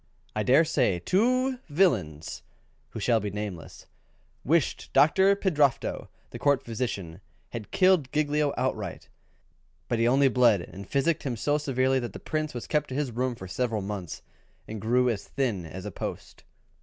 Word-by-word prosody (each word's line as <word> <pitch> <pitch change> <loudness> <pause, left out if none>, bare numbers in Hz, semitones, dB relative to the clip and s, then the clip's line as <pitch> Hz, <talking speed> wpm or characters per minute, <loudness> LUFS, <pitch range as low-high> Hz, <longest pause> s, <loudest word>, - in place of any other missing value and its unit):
I 105 - 0
dare 135 +8 +5
say 125 - +1
two 255 - +1
villains, 110 - 0 0.5
who - - -7
shall 115 -2 +2
be 105 -1 -3
nameless, 100 -4 -7 0.6
wished 160 0 +1
Doctor 190 +6 +5
Pildrafto, 150 -9 +1 0.2
the - - -7
Court 140 -2 +2
physician, 105 -7 -4 0.3
had 115 -3 -7
killed 185 -8 +3
Giglio 150 0 +1 0.2
right 100 -4 -5
out, - - -26 0.8
but 120 - -1
he 115 - +3
only 135 +3 +4
bled 120 -7 +4
and 95 +3 -10
physicked 150 +4 +1
him 125 -4 -3
so 145 +6 +1
severely 130 -2 +1
that 120 -2 -5
the - - -8
Prince 155 -3 -3
was 120 - -5
kept 150 -1 0
to 130 - -5
his 140 -3 -1
room 125 +1 -1
for 95 -4 -9
several 115 0 -1
months, 95 -4 -6 0.4
and 110 -1 -6
grew 125 +3 +2
as 115 -5 -2
thin 110 -11 -2
as 95 +4 -8
a 105 - -4
post. - - -7
125 Hz, 170 wpm, -27 LUFS, 105-150 Hz, 0.8 s, dare